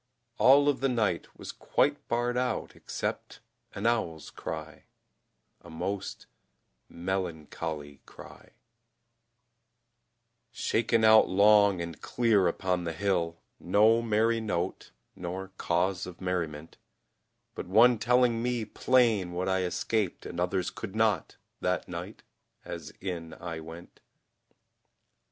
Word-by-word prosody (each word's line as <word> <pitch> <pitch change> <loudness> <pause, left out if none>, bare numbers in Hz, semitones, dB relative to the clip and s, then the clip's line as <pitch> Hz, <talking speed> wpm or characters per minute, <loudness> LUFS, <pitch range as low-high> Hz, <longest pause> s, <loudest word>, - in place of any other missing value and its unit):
All 140 +2 +6
of 145 -2 +2
the 135 - +1
night 110 -8 0
was - - -7
quite - - 0
barred 120 +1 0
out 125 0 -2
except - - -5 0.4
An 100 - -4
owl's 110 -10 -1
cry, - - -7 0.8
a - - -14
most 95 +4 -4 0.6
melancholy 80 -5 -4
cry - - -14 2.0
Shaken 115 0 +1
out 110 0 +7
long 100 -1 +5
and 85 -2 -8
clear 110 -6 +2
upon 90 +1 -1
the 85 -1 -3
hill, 85 -3 -1 0.2
No 110 +5 +4
merry 115 0 +1
note, 95 -4 -3 0.3
nor 90 +2 -5
cause 90 +2 0
of 90 -2 -10
merriment, 80 -4 -4 0.8
But - - -6
one 115 +5 +5
telling 120 0 +3
me 120 -2 -1
plain 110 -6 +2
what 90 +2 -2
I 95 0 +1
escaped 95 +2 -1
And - - -6
others 90 +1 0
could 95 - -7
not, 110 -1 +1 0.2
that - - -1
night, - - -7 0.4
as 85 -3 -7
in 85 -4 -5
I 85 -2 -6
went. 80 +2 -11
95 Hz, 115 wpm, -29 LUFS, 85-115 Hz, 2.0 s, out